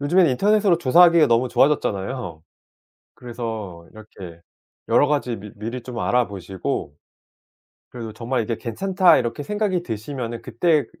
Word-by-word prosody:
요즘엔 175 Hz, +5 st, +3 dB
인터넷으로 200 Hz, +7 st, +3 dB
조사하기가 170 Hz, +2 st, +5 dB
너무 120 Hz, +2 st, +2 dB
좋아졌잖아요. 110 Hz, -, 0 dB, 0.7 s
그래서 110 Hz, -8 st, -7 dB
이렇게 95 Hz, -6 st, -12 dB, 0.5 s
여러 145 Hz, -, +4 dB
가지 140 Hz, -5 st, -1 dB
미 105 Hz, 0 st, -10 dB
미리 115 Hz, +4 st, -6 dB
좀 120 Hz, -1 st, -7 dB
알아보시고 100 Hz, -10 st, -2 dB, 1.0 s
그래도 115 Hz, -3 st, -7 dB
정말 120 Hz, +1 st, -2 dB
이게 115 Hz, +1 st, -3 dB
'괜찮다.' 185 Hz, -, +2 dB
이렇게 120 Hz, +3 st, -3 dB
생각이 205 Hz, -3 st, -1 dB
드시면은 115 Hz, 0 st, -5 dB
그때 145 Hz, +5 st, +1 dB
125 Hz, 340 characters per minute, -22 LUFS, 110-150 Hz, 1.0 s, 조사하기가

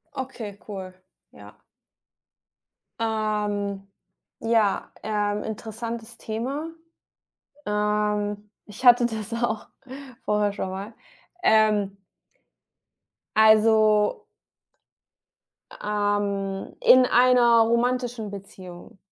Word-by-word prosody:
Okay, 230 Hz, -6 st, -6 dB
cool, 190 Hz, -3 st, -8 dB, 0.4 s
ja. -, -, -15 dB, 1.4 s
Ähm, 210 Hz, -3 st, -2 dB, 0.5 s
ja, 225 Hz, -3 st, +1 dB
ähm, 210 Hz, -1 st, -1 dB
interessantes 225 Hz, +1 st, -6 dB
Thema. 260 Hz, +8 st, -4 dB, 1.0 s
Ähm, 210 Hz, 0 st, -1 dB, 0.2 s
ich 215 Hz, +5 st, -11 dB
hatte 245 Hz, 0 st, +7 dB
das 220 Hz, -1 st, -5 dB
auch 220 Hz, -3 st, -2 dB, 0.6 s
vorher 210 Hz, -1 st, +1 dB
schon 190 Hz, -, -4 dB
mal. 195 Hz, +4 st, -7 dB, 0.5 s
Ähm 210 Hz, -, +3 dB, 1.4 s
also 215 Hz, -1 st, +4 dB, 1.6 s
ähm, 205 Hz, -2 st, -2 dB
in 255 Hz, 0 st, +6 dB
einer 245 Hz, -2 st, +5 dB
romantischen 235 Hz, -1 st, 0 dB
Beziehung 185 Hz, -2 st, -11 dB
215 Hz, 70 wpm, -24 LUFS, 205-230 Hz, 1.6 s, hatte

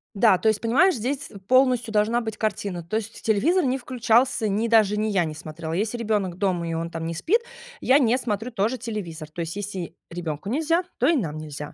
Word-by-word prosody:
Да, 200 Hz, -2 st, +5 dB
то 220 Hz, -, -1 dB
есть, 215 Hz, -, 0 dB
понимаешь, 295 Hz, +10 st, +4 dB
здесь 270 Hz, +6 st, -3 dB, 0.2 s
полностью 250 Hz, -3 st, +3 dB
должна 220 Hz, +3 st, +2 dB
быть 220 Hz, -2 st, -5 dB
картина. 200 Hz, -5 st, -2 dB
То 215 Hz, +7 st, -2 dB
есть 225 Hz, 0 st, -6 dB
телевизор 300 Hz, -, +2 dB
не 260 Hz, 0 st, +1 dB
включался, 240 Hz, -1 st, +2 dB
ни 210 Hz, +3 st, 0 dB
даже 215 Hz, -3 st, +4 dB
ни 215 Hz, +1 st, 0 dB
я 190 Hz, -5 st, +2 dB
не 155 Hz, -, -5 dB
смотрела. 160 Hz, +1 st, -6 dB
Если 215 Hz, +6 st, -1 dB
ребенок 205 Hz, -6 st, -1 dB
дома, 180 Hz, -4 st, 0 dB
и 165 Hz, -, -2 dB
он, 165 Hz, +1 st, -3 dB
там, 165 Hz, -1 st, -5 dB
не 165 Hz, -, -2 dB
спит, 375 Hz, -, +1 dB, 0.4 s
я 265 Hz, +3 st, +5 dB
не 245 Hz, -2 st, +3 dB
смотрю 225 Hz, -1 st, -3 dB
тоже 225 Hz, +3 st, 0 dB
телевизор. 190 Hz, -9 st, -6 dB
То 170 Hz, +2 st, -6 dB
есть 165 Hz, +3 st, -4 dB
если 190 Hz, -5 st, -5 dB
ребенку 170 Hz, 0 st, -5 dB
нельзя, 320 Hz, +7 st, +1 dB, 0.2 s
то 255 Hz, -, +3 dB
и 335 Hz, -, +4 dB
нам 160 Hz, -, -2 dB
нельзя. 150 Hz, -1 st, -7 dB
215 Hz, 215 wpm, -24 LUFS, 175-245 Hz, 0.4 s, Да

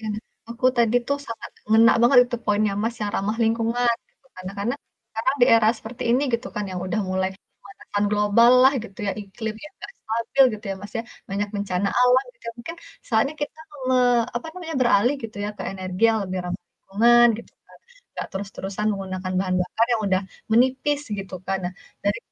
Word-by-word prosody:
Iya. 220 Hz, -, -5 dB, 0.4 s
Aku 235 Hz, +2 st, 0 dB
tadi 235 Hz, 0 st, +3 dB
tuh 280 Hz, -, +1 dB
sangat 230 Hz, -, -7 dB, 0.2 s
ngena 225 Hz, +1 st, +7 dB
banget 245 Hz, +2 st, +6 dB
itu 245 Hz, 0 st, -3 dB
poinnya 210 Hz, 0 st, +2 dB
Mas 230 Hz, +1 st, -1 dB
yang 205 Hz, -, -1 dB
ramah 210 Hz, +3 st, -1 dB
lingkungan 230 Hz, +2 st, +2 dB, 0.2 s
itu. 275 Hz, -, -34 dB
Karena 185 Hz, +1 st, -7 dB
karena, 220 Hz, +6 st, -1 dB, 0.3 s
sekarang 225 Hz, +5 st, -1 dB
di -, -, +8 dB
era 225 Hz, -1 st, +5 dB
seperti 240 Hz, +3 st, -8 dB
ini 250 Hz, +4 st, +3 dB
gitu 235 Hz, +3 st, -1 dB
kan 210 Hz, -2 st, -2 dB
yang 180 Hz, -, -4 dB
udah 215 Hz, +4 st, -1 dB
mulai 190 Hz, 0 st, 0 dB, 0.3 s
pemanasan 205 Hz, +1 st, -4 dB
global 210 Hz, +3 st, +5 dB
lah 265 Hz, -, +7 dB
gitu 195 Hz, -4 st, -12 dB
ya 195 Hz, -, 0 dB
iklim 215 Hz, +2 st, -6 dB
yang 300 Hz, -, -11 dB
gak -, -, -7 dB
stabil 230 Hz, +5 st, +1 dB
gitu 210 Hz, -, -11 dB
ya -, -, -1 dB
Mas 205 Hz, 0 st, -9 dB
ya, -, -, -2 dB, 0.3 s
banyak 200 Hz, +1 st, -1 dB
bencana 200 Hz, -1 st, -1 dB
alam 250 Hz, +1 st, +5 dB
gitu -, -, -27 dB
ya -, -, -4 dB
mungkin 330 Hz, +8 st, -7 dB, 0.3 s
soalnya 255 Hz, +6 st, +1 dB
kita 300 Hz, -, -5 dB, 0.3 s
me 260 Hz, -, +3 dB, 0.4 s
apa 240 Hz, -, -4 dB
namanya, 345 Hz, -2 st, -7 dB
beralih 240 Hz, +1 st, +4 dB
gitu 225 Hz, -2 st, -7 dB
ya 205 Hz, -, -2 dB
ke -, -, -6 dB
energi 185 Hz, 0 st, -6 dB
yang 220 Hz, -, +1 dB
lebih 185 Hz, 0 st, -3 dB
ramah 180 Hz, +1 st, -4 dB
lingkungan, 240 Hz, +4 st, +4 dB
gitu 235 Hz, -, -12 dB
kan. -, -, -19 dB, 0.4 s
Gak -, -, -3 dB
terus-terusan 200 Hz, +1 st, -4 dB
menggunakan 185 Hz, -2 st, -4 dB
bahan 185 Hz, -1 st, -1 dB
bakar 225 Hz, +5 st, 0 dB
yang 225 Hz, -, -1 dB
udah 185 Hz, -1 st, +2 dB, 0.3 s
menipis 260 Hz, +5 st, +2 dB, 0.2 s
gitu 195 Hz, -1 st, -6 dB
kan. 195 Hz, 0 st, 0 dB
Nah, 180 Hz, -, -3 dB, 0.3 s
dari 205 Hz, +2 st, +1 dB
220 Hz, 195 wpm, -23 LUFS, 195-240 Hz, 0.4 s, di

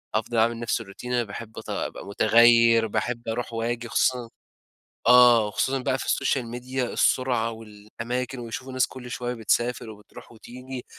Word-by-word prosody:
أفضل 115 Hz, +2 st, -1 dB
أعمل 115 Hz, +1 st, +2 dB
نفس 120 Hz, 0 st, -1 dB
الروتين 115 Hz, +4 st, -8 dB
أنا 120 Hz, -1 st, +2 dB
باحب 110 Hz, +1 st, -9 dB
أتغ -, -, -4 dB
أبقى -, -, -8 dB
متغير، 115 Hz, +2 st, +5 dB
باحب 115 Hz, +3 st, -3 dB
أروح 115 Hz, +1 st, -3 dB
وآجي 115 Hz, +1 st, -3 dB
خصوصًا 125 Hz, -2 st, 0 dB, 0.8 s
آه 120 Hz, -3 st, +7 dB
وخصوصًا 130 Hz, +6 st, -1 dB
بقى 130 Hz, +1 st, -1 dB
في -, -, -5 dB
السوشيال 135 Hz, -2 st, 0 dB
ميديا 125 Hz, +1 st, -4 dB
السرعة 120 Hz, -3 st, +1 dB
والأماكن 115 Hz, +4 st, -6 dB
ويشوفوا 125 Hz, +3 st, -7 dB
ناس 130 Hz, -1 st, +2 dB
كل 125 Hz, -1 st, -10 dB
شوية 125 Hz, 0 st, -4 dB
بتسافر، 120 Hz, 0 st, -1 dB
وبتروح 110 Hz, +3 st, -14 dB
وتيجي، 125 Hz, +2 st, -9 dB
120 Hz, 155 wpm, -25 LUFS, 115-125 Hz, 0.8 s, آه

